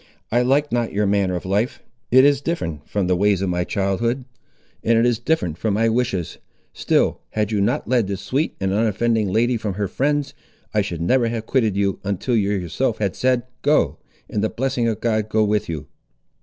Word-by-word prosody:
I 120 +2 +3
like 140 +4 +2
not 120 -1 0
your 105 +1 +1
manner 100 -2 +1
of 90 - -5
life; 100 +6 -1 0.3
it 130 +2 +6
is 145 -1 +3
different 85 - -4
from 100 -2 0
the 90 0 +2
ways 100 0 +2
of 95 - 0
my 90 0 0
childhood, 115 +8 -1 0.6
and 115 0 +3
it 115 - +4
is 120 -2 +2
different 120 - -1
from 110 -3 0
my 115 +2 +2
wishes; 115 -7 -1 0.3
still, - - +1
had 105 0 0
you 105 -2 +1
not 100 - 0
led 120 -4 +2
this 100 -1 -3
sweet 145 +5 -1
and 95 0 0
unoffending 110 -1 +1
lady 120 +4 +2
from 105 -4 -3
her 100 0 -1
friends, 145 +7 -1 0.4
I 105 - +3
should 85 -5 -4
never 120 +7 +2
have 115 -1 -3
quitted 110 -6 +1
you, 100 -1 0
until 100 +5 -1
you 100 -3 +2
yourself 105 +5 -1
had 100 -3 -1
said, 125 -1 +1 0.2
Go, 150 +1 +2 0.3
and 105 - -2
the 110 - +1
blessing 130 -2 -1
of 110 -1 -2
God 110 -2 0
go 110 0 +2
with 105 -2 0
you!" 80 -3 -4
110 Hz, 205 wpm, -21 LUFS, 100-120 Hz, 0.6 s, it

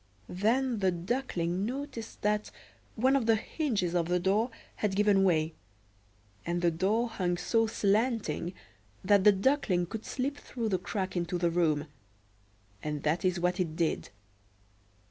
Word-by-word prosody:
Then 230 +5 +1
the 190 -1 +3
Duckling 180 -2 -2
noticed 255 -1 -5
that 210 0 +1 0.5
one 260 +4 +3
of 250 -5 +1
the 225 - +6
hinges 215 - -1
of 170 -2 +1
the 180 +1 +1
door 200 +6 +2 0.3
had 205 -3 -1
given 205 -1 +4
way, 160 -4 +2 0.9
and 175 +1 -2
the 170 - +4
door 205 +8 +1
hung 180 -6 -1
so 225 +5 +1
slanting 205 - 0 0.5
that 200 0 +4
the 210 - +9
Duckling 195 -4 +1
could 220 +5 -6
slip 280 +2 -2
through 235 -5 -4
the 185 -3 +1
crack 190 0 -3
into 175 0 -1
the 170 -1 +1
room; 155 -4 +1 1.0
and 150 -1 -4
that 155 +3 +1
is 185 -1 +1
what 180 +1 0
it 165 -4 -1
did. 165 -1 -1
195 Hz, 150 wpm, -30 LUFS, 175-225 Hz, 1.0 s, the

